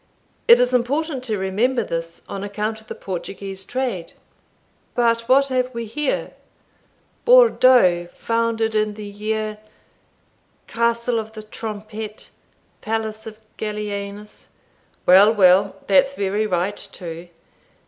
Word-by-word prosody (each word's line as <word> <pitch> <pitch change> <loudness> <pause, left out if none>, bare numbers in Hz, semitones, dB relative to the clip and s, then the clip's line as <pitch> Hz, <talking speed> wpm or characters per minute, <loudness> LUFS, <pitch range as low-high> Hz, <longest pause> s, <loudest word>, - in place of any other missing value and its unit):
It 235 - +8
is 250 0 +2
important 270 +3 0
to 220 -4 -1
remember 220 +6 0
this, 165 -2 -5
on 195 0 -5
account 210 +2 -3
of 220 - -23
the - - -6
Portuguese 195 +1 -6
trade 230 -7 -3 0.8
But 230 -1 +1
what 275 +1 +5
have 255 -1 0
we 235 0 -3
here? 285 +6 -2 0.9
Bourdeaux 255 - +5
founded 230 -1 0
in 215 -1 0
the 210 0 -8
year 215 +1 -3 1.1
Castle 235 0 0
of 220 0 -7
the 215 -1 -8
Trompette 215 0 -7 0.5
Palace 220 0 -3
of 215 -1 -9 0.2
Gallienus 210 -1 -5 0.6
Well, 195 +4 +7
well, 190 0 +5
that's 275 0 +3
very 205 +1 -1
right 185 +2 -1
too. 175 -3 -7
215 Hz, 120 wpm, -21 LUFS, 200-235 Hz, 1.1 s, It